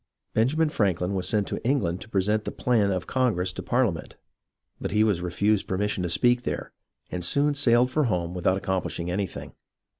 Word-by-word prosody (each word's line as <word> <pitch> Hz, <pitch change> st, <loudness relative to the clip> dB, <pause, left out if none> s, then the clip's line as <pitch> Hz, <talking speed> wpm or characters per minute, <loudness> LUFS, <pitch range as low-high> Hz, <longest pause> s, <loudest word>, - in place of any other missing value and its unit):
Benjamin 150 Hz, +8 st, +2 dB
Franklin 95 Hz, -, 0 dB
was 90 Hz, -1 st, -1 dB
sent 105 Hz, -2 st, +1 dB
to -, -, -4 dB
England 100 Hz, -10 st, 0 dB
to -, -, -11 dB
present 105 Hz, +2 st, +1 dB
the -, -, -3 dB
plan 115 Hz, -5 st, +1 dB
of 95 Hz, -2 st, -1 dB
Congress 105 Hz, -8 st, 0 dB
to -, -, -6 dB
Parliament, 120 Hz, -9 st, -1 dB, 0.6 s
but -, -, -3 dB
he 105 Hz, +1 st, +3 dB
was 100 Hz, -5 st, +1 dB
refused 100 Hz, +4 st, 0 dB
per 95 Hz, -, -1 dB
mission 105 Hz, -1 st, -1 dB
to 90 Hz, -, -2 dB
speak 120 Hz, +7 st, +3 dB
there, -, -, -4 dB, 0.4 s
and 90 Hz, -1 st, -3 dB
soon 145 Hz, +11 st, +2 dB
sailed 125 Hz, -3 st, +3 dB
for 150 Hz, +1 st, +2 dB
home 90 Hz, -6 st, -1 dB
without 90 Hz, +1 st, +1 dB
accomplishing 95 Hz, -2 st, -2 dB
anything. 95 Hz, 0 st, -4 dB
100 Hz, 185 wpm, -26 LUFS, 90-120 Hz, 0.6 s, he